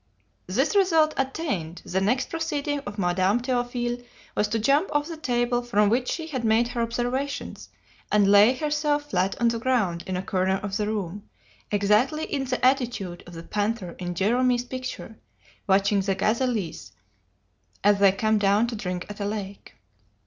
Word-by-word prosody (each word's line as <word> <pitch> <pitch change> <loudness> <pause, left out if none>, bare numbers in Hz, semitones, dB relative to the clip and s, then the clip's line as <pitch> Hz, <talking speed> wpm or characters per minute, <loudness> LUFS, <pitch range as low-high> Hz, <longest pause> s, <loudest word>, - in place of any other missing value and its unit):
"This - - 0
result 325 -6 +4
attained, 265 - -3
the 190 +1 -1
next 245 +7 0
proceeding 295 -3 -2
of 205 +1 -6
Madame 185 +3 +2
Théophile 245 -1 -2 0.3
was 210 - +1
to 230 - -1
jump 280 - +2
off 295 0 +1
the 335 - -6
table 245 -4 0
from 210 -4 +2
which 245 +3 +1
she 325 - -3
had 270 -7 -4
made 225 +2 +3
her 245 -1 -2
observations, 245 +4 -3 0.4
and 210 -1 +4
lay 205 +5 +6
herself 295 0 -1
flat 185 +1 0
on 235 - +3
the 230 0 -2
ground 220 -9 0
in 185 -1 -2
a 185 - -3
corner 190 0 +1
of 200 -1 -3
the 210 0 -1
room, 205 -1 -4 0.4
exactly 210 +9 +2
in 275 -3 -2
the 250 -1 -1
attitude 240 -9 0
of 175 - -11
the 165 - -8
panther 205 -1 -2
in 175 -1 -4
Gérôme's 245 +6 +2
picture 255 -3 -7 0.5
watching 200 +1 +3
the 195 0 0
gazelles 215 - -1 0.9
as 205 0 +4
they 200 -1 +6
come 215 +2 +1
down 205 +2 +3
to 235 -1 -4
drink 180 -4 -4
at 205 0 -9
a 200 - -2
lake. 200 -1 -6
225 Hz, 170 wpm, -25 LUFS, 200-255 Hz, 0.9 s, lay